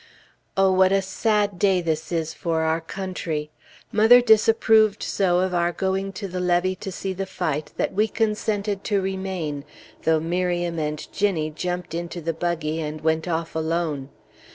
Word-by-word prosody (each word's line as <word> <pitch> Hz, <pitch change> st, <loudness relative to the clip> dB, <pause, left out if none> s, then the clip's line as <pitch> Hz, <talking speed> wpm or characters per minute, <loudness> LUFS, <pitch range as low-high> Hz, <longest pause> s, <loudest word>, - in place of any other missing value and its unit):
Oh, 195 Hz, 0 st, +5 dB
what 185 Hz, 0 st, +4 dB
a 195 Hz, -, +4 dB
sad 205 Hz, 0 st, 0 dB
day 195 Hz, -2 st, +3 dB
this 160 Hz, -1 st, -2 dB
is 160 Hz, -2 st, -1 dB
for 165 Hz, -3 st, -1 dB
our 160 Hz, +1 st, +1 dB
country! 165 Hz, -4 st, -4 dB, 0.4 s
Mother 225 Hz, +3 st, +7 dB
disapproved 220 Hz, -2 st, +4 dB
so 180 Hz, -2 st, +1 dB
of 185 Hz, -1 st, -1 dB
our 175 Hz, 0 st, +2 dB
going 190 Hz, +2 st, -1 dB
to 195 Hz, +2 st, -5 dB
the 180 Hz, 0 st, -4 dB
levee 180 Hz, +1 st, +1 dB
to 195 Hz, -, -6 dB
see 190 Hz, +1 st, -4 dB
the 190 Hz, +1 st, -4 dB
fight, 155 Hz, -5 st, -3 dB
that -, -, -1 dB
we 210 Hz, +3 st, +2 dB
consented 210 Hz, -2 st, -1 dB
to 205 Hz, -3 st, +1 dB
remain, 190 Hz, -6 st, -3 dB, 0.4 s
though 160 Hz, -1 st, +3 dB
Miriam 175 Hz, 0 st, -1 dB
and 150 Hz, 0 st, -3 dB
Ginnie 175 Hz, -7 st, 0 dB
jumped 180 Hz, +2 st, -4 dB
into 170 Hz, +1 st, -4 dB
the 165 Hz, 0 st, -2 dB
buggy 165 Hz, -1 st, -2 dB
and 155 Hz, 0 st, -5 dB
went 160 Hz, +1 st, 0 dB
off 165 Hz, -1 st, -2 dB
alone. 160 Hz, -4 st, -1 dB
180 Hz, 165 wpm, -24 LUFS, 160-195 Hz, 0.4 s, Mother